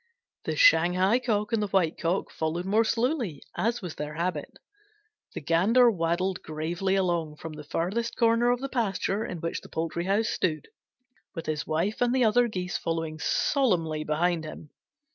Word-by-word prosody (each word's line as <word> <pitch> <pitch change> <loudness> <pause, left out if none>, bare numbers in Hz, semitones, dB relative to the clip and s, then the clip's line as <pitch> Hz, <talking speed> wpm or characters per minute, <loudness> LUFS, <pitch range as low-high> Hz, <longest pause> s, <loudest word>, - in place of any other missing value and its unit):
The - - -1
Shanghai 195 - +5
Cock 220 -3 -1
and 225 - +2
the 210 - 0
White 185 -5 +1
Cock 175 +3 -1
followed 160 +3 -2
more 210 +4 +3
slowly, 230 - -1
as 230 -1 -1
was 175 -3 -5
their 150 0 -6
habit. 165 -3 -3 0.8
The - - -4
Gander 210 - +4
waddled 180 +1 -1
gravely 170 +5 -2
along 170 -5 0
from 160 +1 -8
the 150 0 -9
farthest 195 +10 -2
corner 230 +1 +3
of 245 0 +1
the 275 - -2
pasture 215 -4 -1
in 175 -6 -6
which 165 - -3
the - - -14
poultry 165 +1 -3
house 210 +4 +1
stood, 155 -9 -1 0.7
with 165 -1 -5
his 155 -1 -3
wife 175 +9 -1
and 245 +1 +2
the 255 - +3
other 240 +2 +4
Geese 180 -5 -3
following 165 -1 -3
solemnly 165 - +1
behind 160 +2 0
him. 155 -1 -9
180 Hz, 170 wpm, -27 LUFS, 165-225 Hz, 0.8 s, Shanghai